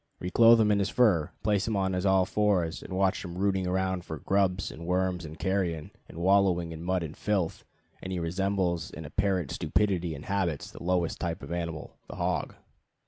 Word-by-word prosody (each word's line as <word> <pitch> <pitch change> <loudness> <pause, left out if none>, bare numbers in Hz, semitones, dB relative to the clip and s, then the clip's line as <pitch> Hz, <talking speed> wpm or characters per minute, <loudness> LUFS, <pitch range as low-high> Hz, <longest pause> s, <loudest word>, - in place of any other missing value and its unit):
Re 90 - -4
clothe 115 +1 +7
him 105 -1 +4
in 100 - +3
his 100 - 0
fur, 100 -11 +3
place 105 -1 +1
him 110 - 0
on 95 -1 0
his 90 +1 0
all 95 -1 +4
fours, 95 -5 0
watch 95 +1 +1
him 90 -1 -7
rooting 95 -1 +1
around 95 0 0
for 80 - -6
grubs 95 +2 0
and 85 +1 -9
worms 90 -1 0
and 80 +1 -9
carrion, 90 -5 -1 0.2
and - - -11
wallowing 90 -2 +3
in 80 0 -7
mud 90 0 0
and 80 -1 -6
filth, 100 -6 -1 0.4
and 95 - -6
he 95 - -2
resembles 90 -1 -1
in 80 - -9
apparent 95 -2 0
stupidity 90 -6 0
and 70 - -9
habits 95 -7 -1
the - - -12
lowest 90 -1 0
type 85 -2 -3
of - - -8
animal 85 -3 -4
the - - -7
hog. - - -2
90 Hz, 195 wpm, -28 LUFS, 85-100 Hz, 0.4 s, clothe